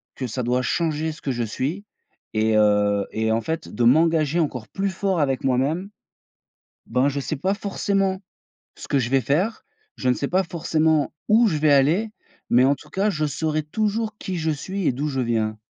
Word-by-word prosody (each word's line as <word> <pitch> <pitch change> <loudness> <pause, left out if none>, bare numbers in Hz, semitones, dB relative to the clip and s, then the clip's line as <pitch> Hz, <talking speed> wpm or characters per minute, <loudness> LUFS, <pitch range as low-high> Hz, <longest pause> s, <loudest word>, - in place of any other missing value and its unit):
que 130 - -4
ça 125 +2 -3
doit 125 +2 +1
changer 160 +2 -1
ce 155 - -12
que 135 - -1
je 120 - -2
suis 150 - -3 0.5
et 110 0 +2
heu, 105 -1 +3
et 110 0 0
en 115 - +1
fait, 160 +8 -4
de 120 - -2
m'engager 160 +4 +3
encore 125 -9 -2
plus 195 - -2
fort 190 -1 -1
avec 135 -3 0
moi-même. 140 +9 0 1.0
Ben, 130 +4 +2
je 140 0 -3
sais 140 +2 -3
pas 190 +7 0
forcément 195 -1 -1 0.6
ce - - -10
que 140 - +2
je 120 -1 -1
vais 135 -1 +3
faire, 170 - 0 0.3
je 130 - -2
ne 125 - +4
sais 140 - -3
pas 185 +2 +2
forcément 160 -2 +1 0.2
où 225 +1 +5
je 155 -4 -1
vais 150 -1 +4
aller, 160 +11 +3 0.4
mais 125 +2 +5
en 140 +2 +4
tout 150 - -16
cas, 200 +5 +1
je 155 -4 -1
saurai 155 +1 -1
toujours 215 +6 -2
qui 185 -1 -4
je 160 0 0
suis 185 +5 -3
et - - +3
d'où 145 +5 -2
je 135 -2 -2
viens. 110 -3 -1
150 Hz, 200 wpm, -23 LUFS, 125-180 Hz, 1.0 s, où